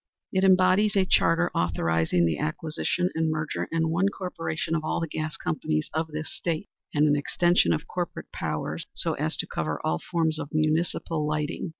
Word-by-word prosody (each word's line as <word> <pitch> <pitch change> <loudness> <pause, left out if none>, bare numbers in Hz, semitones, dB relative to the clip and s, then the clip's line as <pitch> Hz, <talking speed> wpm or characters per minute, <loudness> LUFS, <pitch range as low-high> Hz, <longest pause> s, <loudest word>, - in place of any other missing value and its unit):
It 190 0 +1
embodies 190 +2 +5
a 195 -1 +4
charter 175 -1 +3
authorizing 85 0 +1
the 80 -3 0
acquisition 165 - -1
and 160 0 +1
merger 155 0 -2
in 165 -1 +1
one 185 +4 +2
corporation 165 -4 -3
of 155 -1 0
all 155 - -1
the 165 - -2
gas 155 0 -4
companies 75 -1 -2
of 160 +1 0
this 155 0 -5
State, 165 -3 -3 0.2
and 150 +1 +3
an 145 - +4
extension 175 - +3
of 80 - 0
corporate - - -5
powers - - -3
so - - +1
as - - -2
to - - -1
cover 80 -1 -3
all 80 - +1
forms 160 -3 0
of 145 - -5
municipal 155 0 +1
lighting. 150 +3 -2
155 Hz, 180 wpm, -26 LUFS, 145-175 Hz, 0.2 s, embodies